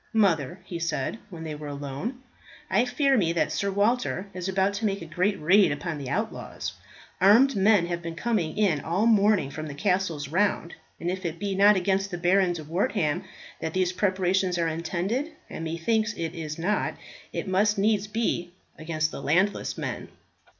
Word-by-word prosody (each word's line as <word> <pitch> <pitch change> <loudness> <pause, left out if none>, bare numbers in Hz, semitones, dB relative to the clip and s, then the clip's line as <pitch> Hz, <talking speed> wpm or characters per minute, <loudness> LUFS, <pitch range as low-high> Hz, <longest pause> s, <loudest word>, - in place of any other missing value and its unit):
"Mother," 175 -6 +2
he 170 -2 -5
said, 165 +4 -2
when 170 -4 -8
they 160 -1 -4
were 150 0 -7
alone, 145 - -5 0.5
"I 220 +6 +4
fear 275 +2 +2
me 170 -8 +2
that 170 - +1
Sir 200 - -1
Walter 205 0 +1
is 185 0 -4
about 190 +1 +1
to 210 +2 -2
make 200 -1 -1
a 165 - -8
great 185 +6 0
raid 180 +2 +5
upon 155 +1 -3
the 135 -2 -5
outlaws. 215 +10 -3 0.5
Armed 235 +8 +6
men 200 -2 +4
have 170 0 -3
been 165 -1 -6
coming 185 -6 -1
in 195 -8 +2
all 170 +5 -1
the 230 +1 +5
morning 205 -8 +3
from 155 +2 -5
the 145 - -7
castles 180 -4 0
round, 175 +1 0 0.3
and 175 - -1
if 185 +1 -5
it 170 -1 -3
be 200 +2 -2
not 200 +2 +6
against 195 +1 +1
the 175 - -4
Baron 180 +1 +3
de 165 -2 -6
Wortham 175 - 0 0.3
that 160 +1 -4
these 185 -1 +1
preparations 185 -1 +1
are 170 -1 +1
intended, 185 - -2 0.2
and - - -5
methinks 215 +8 0
it 165 -3 -3
is 155 -3 -5
not, 185 +6 0 0.4
it - - -4
must 205 +3 +2
needs 210 0 +2
be 205 -5 -1 0.3
against 155 0 -1
the - - -7
landless 185 +9 +1
men." - - -4
185 Hz, 185 wpm, -26 LUFS, 165-205 Hz, 0.5 s, Armed